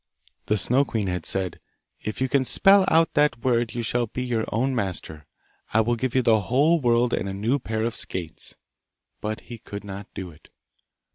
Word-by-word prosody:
The 105 - +2
Snow 125 +8 +2
queen 110 -6 -2
had 90 -3 -2
said, 95 -3 -2 0.4
'If 110 +4 -5
you 130 - +2
can 130 +1 +2
spell 195 - +5
out 165 0 +4
that 150 -6 +2
word 120 -3 +1
you 120 - -2
shalt 120 0 -1
be 125 - -2
your 120 -3 -1
own 130 +5 +1
master. 90 - -4 0.5
I 110 - +6
will 120 +2 +1
give 130 +2 -2
you 130 - +4
the 110 -2 +4
whole 145 - +3
world 120 -1 +3
and 100 - -1
a 95 - -4
new 115 +8 0
pair 110 -2 -2
of 115 0 -1
skates.' 85 -4 -5 0.7
But 110 +1 -3
he 120 -2 -10
could 100 -1 -8
not 100 0 -7
do 95 -3 -6
it. 75 - -20
115 Hz, 200 wpm, -25 LUFS, 100-130 Hz, 0.7 s, I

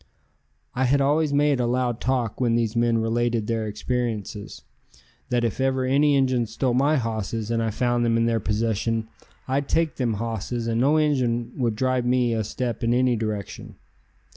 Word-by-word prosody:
I 130 +1 0
had 140 +3 +3
always 145 +2 +2
made 145 -1 +2
a 120 - +1
loud 120 -1 -1
talk 125 -3 -1
when 120 -2 +2
these 115 -1 0
men 115 0 +2
related 115 0 0
their 115 -1 -2
experiences, 105 -1 -4 0.7
that 120 -1 +1
if 115 +2 -1
ever 130 -1 +1
any 140 +2 +3
Injuns 130 -4 +1
stole 120 +2 -1
my 140 +5 +3
hosses 115 -2 -3
and 115 0 +1
I 115 - 0
found 120 +2 0
them 115 -1 +2
in 115 - +2
their 115 -1 +1
possession 110 +1 -1 0.4
I'd 135 +1 -1
take 165 -2 +1
them 120 -4 0
hosses 115 +2 -3
and 115 0 0
no 145 +4 +4
Injun 125 -6 +1
would 120 -5 0
drive 130 +1 0
me 125 -1 +2
a 110 -1 0
step 120 +3 -4
in 115 +1 +2
any 125 -1 +3
direction. 110 -2 -5
120 Hz, 180 wpm, -24 LUFS, 115-130 Hz, 0.7 s, no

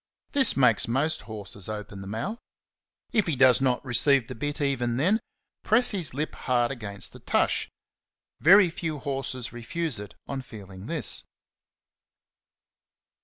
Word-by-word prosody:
This 270 - +5
makes 115 -6 +4
most 145 +7 0
horses 100 -2 -6
open 105 -2 -6
the 95 - -8
mouth. 115 - -4 0.7
If 215 -5 +2
he 160 - 0
does 130 0 +5
not 130 0 +1
receive 135 +1 +4
the - - -6
bit 145 +5 -4
even 125 -4 0
then, 185 - +3 0.4
press 245 +3 +4
his 170 - -1
lip 150 +2 -2
hard 120 -1 0
against 100 -6 -4
the - - -12
tush; - - 0 0.7
very 185 +2 +6
few 160 -2 -4
horses 135 -3 -4
refuse 125 +2 -3
it 105 -1 -9
on 135 -1 -4
feeling 100 -5 -11
this. 160 -6 -1
130 Hz, 140 wpm, -26 LUFS, 115-155 Hz, 0.7 s, very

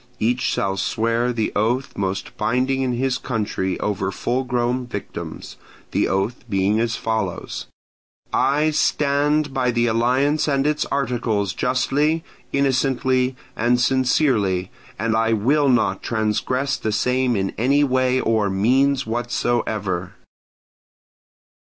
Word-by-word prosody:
Each 120 +3 0
shall 95 0 0
swear 115 +4 0
the 115 -3 -1
oath 120 +6 0
most 95 0 -3
binding 130 +4 0
in 130 -2 0
his 125 +1 0
country 105 -6 -2
over 95 -2 -1
full 125 +6 -1
grown 125 0 -1
victims: 100 -4 -7 0.3
the - - +1
oath 100 +7 -1
being 100 +2 +1
as 115 0 0
follows: 110 -5 -3 0.7
"I 145 +4 +2
STAND 150 0 +1
BY 130 -2 +1
THE 120 -1 +1
ALLIANCE 130 +7 +2
AND 140 -1 +1
ITS 150 0 +1
ARTICLES, 120 -7 -1
JUSTLY, 145 +7 +1 0.3
INNOCENTLY, 130 -1 +1 0.2
AND 120 +2 +2
SINCERELY, 125 -8 +2 0.3
AND 115 +1 0
I 115 0 +2
WILL 140 +7 +2
NOT 110 -6 +2
TRANSGRESS 125 +5 -1
THE 110 - -2
SAME 125 +3 +1
IN 95 -1 -1
ANY 140 +5 +3
WAY 130 -1 +2
OR 110 -3 +1
MEANS 130 +8 +2
WHATSOEVER." 110 -5 -1
120 Hz, 120 wpm, -22 LUFS, 110-130 Hz, 0.7 s, ANY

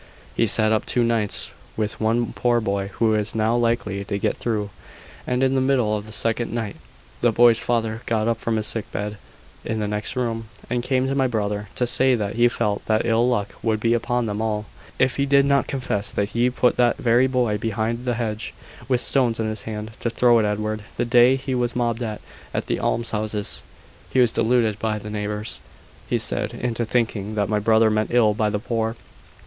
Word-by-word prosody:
"He 115 - +2
sat 110 +1 +4
up 110 - 0
two 120 - +2
nights 115 -3 0 0.3
with 110 0 -2
one 115 +2 +1
poor 120 -1 +2
boy 100 -3 -1
who 110 -1 +2
is 105 0 -1
now 110 +1 +2
likely 115 -4 0
to 100 - -2
get - - 0
through; 105 -4 -2 0.6
and 125 +1 +1
in 130 0 +3
the 135 - +2
middle 130 -5 +2
of 105 0 -5
the - - -9
second 115 +1 0
night, 115 -3 -3 0.5
the 120 - +4
boy's 115 0 +5
father 115 -1 -1
got 110 -1 +1
up 115 -1 0
from 115 -1 -1
his 110 -1 -1
sick 115 -1 -2
bed 105 0 -4 0.4
in 110 -1 -2
the 105 - -1
next 105 +4 -3
room, 115 -3 -2 0.2
and 120 0 +1
came 130 +1 0
to 135 - -1
my 135 -1 +2
brother, 105 -3 -2
to 125 - +1
say 130 +1 +4
that 105 -3 -2
he 120 +1 +5
felt 110 -4 -1
that 110 0 +2
ill 115 +1 +3
luck 105 -5 -1
would 110 -1 0
be 115 +2 +2
upon 120 +1 0
them 105 0 -3
all, 105 -1 -1 0.3
if 130 0 +2
he 140 0 +1
did 140 0 +5
not 140 -1 +2
confess 125 -7 -2
that 100 0 -1
he 120 +2 +1
put 125 0 +1
that 120 -1 +3
very 120 +2 +3
boy 125 -5 0
behind 115 +2 -2
the 125 -1 -1
hedge, 110 -2 -4 0.3
with 125 -2 +1
stones 120 -4 +1
in 110 - 0
his 110 0 -3
hand, 105 0 -5
to 120 - -1
throw 120 0 +4
at 110 - +2
Edward, 105 +1 -2
the 120 - 0
day 120 +2 +5
he 135 0 -4
was 120 -1 -1
mobbed 120 -1 0
at 110 -3 -3 0.5
the - - -1
almshouses. 105 - -1 0.5
He 130 - +1
was 120 -3 +5
deluded 115 -2 +1
by 110 0 -1
the 105 0 -7
neighbours, 105 +1 -2 0.5
he - - +2
said, - - 0
into 120 -1 -2
thinking 110 -3 -1
that 100 -2 0
my 105 -1 +1
brother 110 +1 +4
meant 110 0 0
ill 115 -3 +4
by 105 0 0
the 105 - -1
poor." 115 0 -2
115 Hz, 210 wpm, -23 LUFS, 105-120 Hz, 0.6 s, boy's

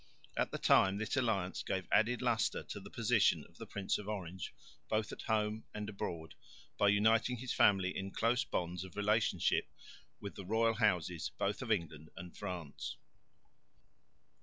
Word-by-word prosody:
At - - +1
the - - -4
time 95 +1 +4
this 110 +3 -2
alliance 110 -8 0
gave 95 -2 -2
added 115 +4 +3
lustre 120 -3 +1
to - - -7
the - - -11
position - - +2
of - - -23
the - - -7
Prince 100 -2 -1
of 105 - -8
Orange, 95 -3 -5 0.4
both 110 -1 0
at - - -7
home 110 0 0
and 105 -1 -4
abroad, 85 -6 -5 0.4
by 100 - +3
uniting 110 +4 +4
his 125 +2 -3
family 95 -2 +4
in 95 0 -3
close 115 +6 +1
bonds 90 -6 -3
of 95 -2 -11
relationship 105 -3 +2 0.5
with 100 - -6
the 100 - -8
royal 115 +4 +2
houses 90 -7 +1
both 100 +4 -1
of 120 -3 -3
England 80 -6 -1
and 90 0 -9
France. 90 -8 -5
100 Hz, 160 wpm, -35 LUFS, 90-110 Hz, 0.5 s, time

